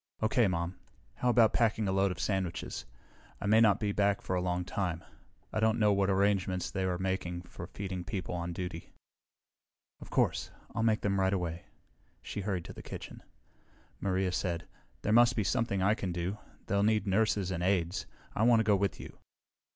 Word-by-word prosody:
"Okay, 110 Hz, 0 st, +3 dB
Mom. 85 Hz, 0 st, -2 dB, 0.4 s
How 125 Hz, -, +1 dB
about 115 Hz, -2 st, +5 dB
packing 110 Hz, -3 st, +2 dB
a -, -, +1 dB
load 95 Hz, +1 st, +3 dB
of 90 Hz, -1 st, -5 dB
sandwiches? 95 Hz, -2 st, -2 dB, 0.5 s
I -, -, -5 dB
may 110 Hz, +2 st, +5 dB
not 105 Hz, -3 st, +5 dB
be 105 Hz, -1 st, 0 dB
back 100 Hz, 0 st, +2 dB
for 90 Hz, -, -2 dB
a 90 Hz, -, +1 dB
long 90 Hz, 0 st, -1 dB
time. 90 Hz, -3 st, -2 dB, 0.5 s
I 110 Hz, -, 0 dB
don't 110 Hz, 0 st, +3 dB
know 105 Hz, -2 st, +4 dB
what 100 Hz, 0 st, +2 dB
arrangements 95 Hz, -2 st, +1 dB
they 95 Hz, -1 st, -1 dB
are 90 Hz, -1 st, 0 dB
making 90 Hz, -2 st, -2 dB
for 85 Hz, -1 st, -9 dB
feeding 95 Hz, -1 st, -5 dB
the 90 Hz, -, -7 dB
people 95 Hz, -2 st, -4 dB
on 85 Hz, 0 st, -3 dB
duty." 85 Hz, -1 st, -6 dB, 1.1 s
"Of -, -, -11 dB
course. -, -, +1 dB, 0.2 s
I'll 115 Hz, -, -1 dB
make 110 Hz, -1 st, +2 dB
them 100 Hz, -1 st, +1 dB
right 95 Hz, +1 st, +2 dB
away." 85 Hz, -3 st, -3 dB, 0.6 s
She 105 Hz, -, -4 dB
hurried 95 Hz, -4 st, -2 dB
to -, -, -8 dB
the -, -, -9 dB
kitchen. -, -, -8 dB, 0.8 s
Maria 95 Hz, -1 st, 0 dB
said, 85 Hz, -2 st, -2 dB, 0.4 s
"There 105 Hz, -, +1 dB
must 120 Hz, +1 st, +6 dB
be 110 Hz, -, +1 dB
something 100 Hz, -3 st, 0 dB
I 100 Hz, +2 st, +4 dB
can 95 Hz, -5 st, -3 dB
do. 90 Hz, +4 st, -3 dB, 0.3 s
They'll 100 Hz, 0 st, +1 dB
need 110 Hz, +1 st, +2 dB
nurses 100 Hz, -1 st, +1 dB
and 85 Hz, -2 st, -2 dB
aides. 90 Hz, -1 st, 0 dB, 0.3 s
I -, -, -2 dB
want 115 Hz, 0 st, +6 dB
to -, -, +3 dB
go 105 Hz, -1 st, +4 dB
with 100 Hz, -2 st, 0 dB
you." -, -, -10 dB
95 Hz, 195 wpm, -31 LUFS, 90-105 Hz, 1.1 s, must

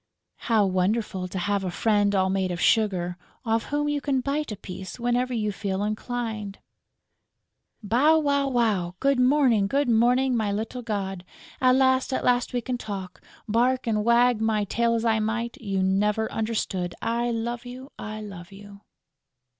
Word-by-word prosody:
How 220 Hz, -3 st, +4 dB
wonderful 190 Hz, 0 st, 0 dB
to 185 Hz, -, -6 dB
have 200 Hz, +2 st, 0 dB
a 185 Hz, -, -2 dB
friend 205 Hz, +1 st, +1 dB
all 190 Hz, -1 st, +2 dB
made 190 Hz, -1 st, 0 dB
of 175 Hz, -1 st, -4 dB
sugar, 185 Hz, -5 st, +1 dB, 0.3 s
off 225 Hz, 0 st, 0 dB
whom 295 Hz, 0 st, -1 dB
you 295 Hz, -1 st, -1 dB
can 275 Hz, -2 st, 0 dB
bite 280 Hz, +1 st, -2 dB
a -, -, -3 dB
piece 185 Hz, +3 st, -8 dB
whenever 245 Hz, +1 st, 0 dB
you 215 Hz, -3 st, -1 dB
feel 195 Hz, -1 st, -3 dB
inclined! 215 Hz, -1 st, -4 dB, 1.3 s
"Bow, 260 Hz, +10 st, +4 dB
wow, 280 Hz, -2 st, +1 dB
wow!... 210 Hz, -8 st, 0 dB
Good 275 Hz, -1 st, +2 dB
morning! 250 Hz, -6 st, +4 dB
Good 280 Hz, +5 st, +1 dB
morning, 245 Hz, +3 st, +3 dB
my 215 Hz, -3 st, 0 dB
little 220 Hz, +5 st, -3 dB
god!... 195 Hz, -5 st, -4 dB, 0.4 s
At 255 Hz, -1 st, +5 dB
last, 260 Hz, 0 st, +3 dB
at -, -, -1 dB
last 245 Hz, -1 st, +2 dB
we 245 Hz, -, -1 dB
can 245 Hz, +1 st, -3 dB
talk!... 195 Hz, -5 st, -7 dB, 0.3 s
Bark 245 Hz, +4 st, +1 dB
and 215 Hz, -2 st, 0 dB
wag 235 Hz, 0 st, +3 dB
my 220 Hz, -1 st, +1 dB
tail 230 Hz, +3 st, +1 dB
as 230 Hz, 0 st, -1 dB
I 220 Hz, -1 st, +3 dB
might, 230 Hz, +2 st, -2 dB
you 195 Hz, -3 st, -1 dB
never 210 Hz, +3 st, +1 dB
understood!... 205 Hz, -5 st, -2 dB
I 235 Hz, +1 st, 0 dB
love 235 Hz, +1 st, -3 dB
you! 255 Hz, +3 st, -9 dB
I 215 Hz, 0 st, -6 dB
love 195 Hz, -3 st, -9 dB
you!" 200 Hz, 0 st, -13 dB
225 Hz, 170 wpm, -25 LUFS, 200-245 Hz, 1.3 s, At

